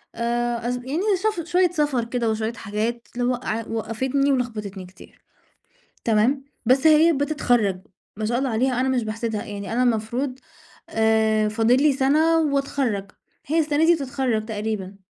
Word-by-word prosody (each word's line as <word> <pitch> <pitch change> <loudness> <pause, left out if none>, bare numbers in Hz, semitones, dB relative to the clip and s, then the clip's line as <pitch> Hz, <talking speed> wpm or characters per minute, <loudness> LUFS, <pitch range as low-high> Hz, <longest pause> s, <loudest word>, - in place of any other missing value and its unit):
آآ، 240 0 -1
اص 245 - -1
يعني 260 +6 -3 0.2
شف 420 -7 0
شوية 360 0 +3
سفر 295 -7 0
كده 235 -1 -1
وشوية 220 +1 -2
حاجات 225 +2 -3
لو 245 0 +1
وقع 230 -3 -3
وقفتني 260 +5 -1
ولخبطتني 210 -7 -3
كتير، 185 +1 -17 0.8
تمام؟ 235 +5 +2 0.2
بس 260 +5 +4
هي 315 +2 +6
بتتخرج، 245 - +1 0.4
ما 215 - -3
شاء 240 +2 0
الله 265 0 -1
عليها، 250 +2 +1
أنا 260 - +1
مش 255 -2 +1
باحسدها، 220 0 -3
يعني 200 0 -6
أنا 250 - +2
المفروض 245 +3 -1 0.5
آآ، 220 -1 +2
فاضل 225 +3 +3
لي 300 -1 +5
سنة 305 +5 +3
وأتخرج، 275 -9 -1 0.4
هي 315 +4 +1
السنة 310 +1 +2
دي 345 - +6
بتتخرج 260 -6 -1
تقريبًا. 210 -3 -4
240 Hz, 150 wpm, -23 LUFS, 220-275 Hz, 0.8 s, هي